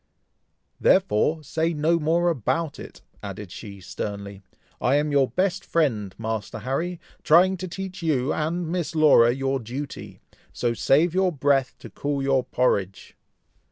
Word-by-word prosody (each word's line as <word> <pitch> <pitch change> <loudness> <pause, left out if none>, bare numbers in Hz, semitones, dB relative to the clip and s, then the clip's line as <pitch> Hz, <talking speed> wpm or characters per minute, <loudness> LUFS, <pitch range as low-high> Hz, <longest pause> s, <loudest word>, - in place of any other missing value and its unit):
"Therefore 160 - +2
say 160 +3 -1
no 160 +3 +2
more 170 +3 +2
about 160 +3 -2
it!" - - -11 0.2
added 100 -1 -7
she, 100 -1 -9
sternly. 100 +1 -6 0.4
"I 130 +3 +3
am 150 +1 +1
your 140 -2 +3
best 190 0 0
friend, 115 - 0
Master 110 -1 -4
Harry, 150 - -3 0.2
trying 180 +4 +5
to 185 +1 -5
teach 185 +1 -7
you 150 -4 0
and 165 +2 -2
Miss 170 -1 -3
Laura 150 -7 +6
your 135 +1 -1
duty, 130 +5 -7 0.3
so 120 -1 -1
save 155 +8 +3
your 185 0 +2
breath 135 -3 +1
to - - -11
cool 140 -1 -2
your 135 -1 +2
porridge." 105 -7 -1
145 Hz, 145 wpm, -24 LUFS, 120-170 Hz, 0.4 s, Laura